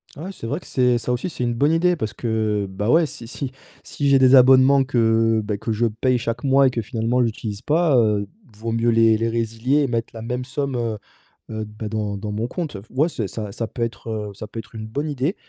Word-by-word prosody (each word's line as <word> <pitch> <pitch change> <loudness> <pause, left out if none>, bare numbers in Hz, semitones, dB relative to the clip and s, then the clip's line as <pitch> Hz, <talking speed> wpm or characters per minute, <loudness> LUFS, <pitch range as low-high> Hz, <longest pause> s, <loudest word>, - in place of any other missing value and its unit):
Ah 150 - -8
ouais 190 - -5
c'est 115 - -8
vrai 145 +7 -2
que - - -17
c'est 125 -2 +2
ça 120 +1 -3
aussi 125 +9 -1
c'est 135 - -4
une 120 -1 0
bonne 145 +7 +2
idée! 175 +2 +3
Parce 110 -8 -3
que 110 -3 -1
bah, 100 +3 -3
ouais 165 +3 +5
si 120 -5 -8
si 130 +2 -5 0.3
si 145 - -3
j'ai 135 -1 +5
des 130 0 +6
abonnements 130 +1 +6
que, 115 -3 +2
beh, 105 -1 -2
que 115 - -4
je 115 +2 +1
paye 120 +3 +1
chaque 115 0 -3
mois 135 0 +5
et - - +3
que 120 -2 -2
finalement 115 +2 0
j'utilise 110 -2 -3
pas, 155 -1 +2
heu, 105 -3 +2 0.3
vaut 115 +2 -4
mieux 115 +1 +1
les 115 -1 +4
les 115 +1 0
résilier 115 +4 0
et 140 - +1
mettre 115 -2 -2
la 115 - -8
même 125 +2 -3
somme, 135 0 -3
heu 115 -2 -2 0.5
heu, 110 -1 -4
d 105 - -13
bah 110 -1 -4
dans 105 -2 -2
dans 105 +1 -5
mon 110 +3 -2
compte, 155 - -4
heu, - - -9
f 115 - -24
ouais 145 +6 +2
c'est 110 -10 -3
ça 105 0 -6
ça 115 +3 -4
peut 120 - -8
être, 115 0 -5
heu, 105 -2 -4
ça 105 +2 -8
peut 115 - -7
être 110 +1 -11
une 110 0 -6
bonne 145 +8 -3
idée, 145 - -1
115 Hz, 265 wpm, -22 LUFS, 110-130 Hz, 0.5 s, des